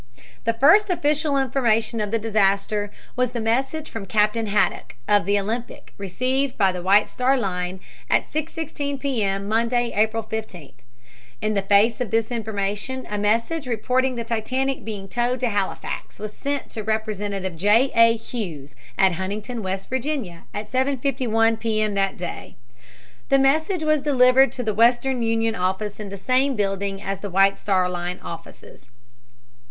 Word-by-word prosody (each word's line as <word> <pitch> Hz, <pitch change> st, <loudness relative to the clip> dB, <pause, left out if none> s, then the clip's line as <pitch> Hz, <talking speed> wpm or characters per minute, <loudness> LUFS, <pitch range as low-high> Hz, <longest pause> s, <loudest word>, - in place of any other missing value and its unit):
The 230 Hz, 0 st, +1 dB
first 355 Hz, -, +5 dB
official 300 Hz, -4 st, +1 dB
information 235 Hz, -4 st, +1 dB
of 210 Hz, -, -2 dB
the 230 Hz, -, +1 dB
disaster 205 Hz, -1 st, +1 dB, 0.3 s
was 250 Hz, -1 st, 0 dB
the 240 Hz, -, -2 dB
message 265 Hz, +7 st, -1 dB
from 210 Hz, -3 st, -7 dB
Captain 215 Hz, +2 st, +1 dB
Haddock, 205 Hz, -9 st, 0 dB
of 205 Hz, -3 st, +3 dB
the 205 Hz, 0 st, +3 dB
Olympic, 225 Hz, +4 st, -5 dB
received 255 Hz, +8 st, -1 dB
by 195 Hz, -3 st, +4 dB
the 180 Hz, -1 st, -5 dB
White 200 Hz, +3 st, +4 dB
Star 260 Hz, +2 st, +1 dB
Line 185 Hz, -4 st, -2 dB, 0.3 s
at -, -, +3 dB
6.16 300 Hz, -2 st, -4 dB
P. 270 Hz, -5 st, -1 dB
M., 195 Hz, 0 st, -1 dB
Monday, 235 Hz, +2 st, +1 dB
April 220 Hz, +2 st, +1 dB
15. 215 Hz, -9 st, -6 dB, 0.7 s
In 215 Hz, 0 st, +1 dB
the 200 Hz, -, +1 dB
face 205 Hz, +5 st, +3 dB
of 245 Hz, -, -1 dB
this 225 Hz, +3 st, 0 dB
information 220 Hz, +3 st, -3 dB
a 210 Hz, -, -1 dB
message 230 Hz, +9 st, 0 dB
reporting 255 Hz, +2 st, 0 dB
the 235 Hz, -, -3 dB
Titanic 255 Hz, +4 st, -2 dB
being 205 Hz, -3 st, -6 dB
towed 245 Hz, +3 st, -1 dB
to 250 Hz, -, +1 dB
Halifax 200 Hz, -3 st, -3 dB
was 210 Hz, 0 st, -6 dB
sent 285 Hz, -1 st, -3 dB
to 220 Hz, -, -4 dB
Representative 205 Hz, -4 st, -2 dB
J. 210 Hz, +10 st, +3 dB
A. 230 Hz, 0 st, +6 dB
Hughes, 170 Hz, -, -6 dB, 0.2 s
at 190 Hz, -1 st, +5 dB
Huntington, 205 Hz, +7 st, -4 dB
W. 190 Hz, -3 st, -2 dB
Va., 245 Hz, -, -4 dB
at 210 Hz, +1 st, -5 dB
7.51 255 Hz, -4 st, +1 dB
P. 220 Hz, -2 st, 0 dB
M. 215 Hz, -1 st, +1 dB
that 195 Hz, -1 st, 0 dB
day. 175 Hz, -1 st, -7 dB, 0.7 s
The 275 Hz, -, +5 dB
message 315 Hz, +6 st, +2 dB
was 310 Hz, -2 st, +2 dB
delivered 265 Hz, -2 st, +5 dB
to 250 Hz, -, -4 dB
the 215 Hz, -2 st, -1 dB
Western 240 Hz, +3 st, +3 dB
Union 225 Hz, 0 st, +1 dB
office 190 Hz, +2 st, -2 dB
in 210 Hz, -2 st, -6 dB
the 200 Hz, -, -7 dB
same 260 Hz, +6 st, +1 dB
building 195 Hz, -1 st, -1 dB
as 195 Hz, 0 st, -3 dB
the 200 Hz, -, -5 dB
White 195 Hz, +2 st, +3 dB
Star 185 Hz, -3 st, +1 dB
Line 180 Hz, 0 st, -4 dB
offices. 165 Hz, -6 st, -11 dB
225 Hz, 160 wpm, -23 LUFS, 200-255 Hz, 0.7 s, A